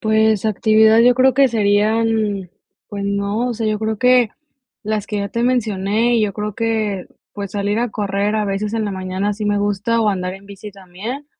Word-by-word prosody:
Pues, 220 -1 +2
actividad 220 +1 +4
yo 245 +1 +5
creo 260 0 +3
que 275 0 +4
serían 215 -2 +1 0.4
pues 200 -1 -5
no, 200 +4 -1
o 245 - -2
sea, 225 0 -3
yo 215 0 0
creo 220 0 -2
que 250 -2 +4 0.5
las 210 -1 -2
que 210 - -3
ya 200 0 -2
te 235 +3 -2
mencioné, 230 -1 +1
yo 210 -2 0
creo 210 +1 -4
que, 215 -4 -2 0.3
pues, 200 -2 -6
salir 205 +1 -1
a 240 -1 -1
correr 205 +1 -1
a 215 - 0
veces 205 +2 -2
en 225 -1 -1
la 205 - -3
mañana 190 +2 -2
sí 210 +1 -5
me 205 0 +1
gusta, 205 +3 0
o 220 - +2
andar 185 -2 -2
en 195 +1 -14
bici 200 +1 -10
también, 200 +9 -8
210 Hz, 200 wpm, -19 LUFS, 200-225 Hz, 0.5 s, yo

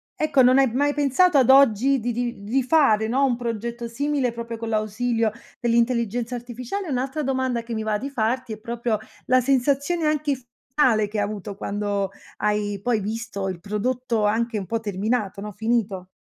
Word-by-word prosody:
ecco, 310 -3 +2
non 255 +2 +6
hai 265 -3 +3
mai 285 +4 +1
pensato 290 +3 +3
ad 255 - +3
oggi 270 0 +5
di 240 +1 -2
di 240 -3 -3
di 240 +7 +1
fare, 245 -6 +3
no, 265 +5 +2
un 255 -3 +1
progetto 235 0 -4
simile 275 +1 -1
proprio 230 0 -6
con 225 0 -5
l'ausilio 225 +1 0 0.3
dell'intelligenza 235 0 +1
artificiale? 245 - -5
E 320 - -5
un'altra 265 +4 -2
domanda 260 -3 -1
che 230 0 -6
mi 220 - -2
va 215 -1 0
di 275 +6 -6
farti, 240 0 -1
è 215 - -9
proprio 235 -1 -2 0.3
la 255 0 +4
sensazione 280 +6 +1
anche 305 -2 +1
f 255 - -15 0.3
ale 225 -8 +4
che 210 +1 -5
hai 205 - +2
avuto 205 -1 -5
quando 200 -1 -2 0.3
hai 210 -1 -1
poi 240 -3 +1
visto 215 -1 -4
il 185 - -5
prodotto 225 +3 -1
anche 225 +1 0
un 190 - -7
po' 230 +4 -1
terminato, 205 0 -2
no, 210 +1 -6
finito. 210 -3 -1
235 Hz, 185 wpm, -23 LUFS, 215-260 Hz, 0.3 s, non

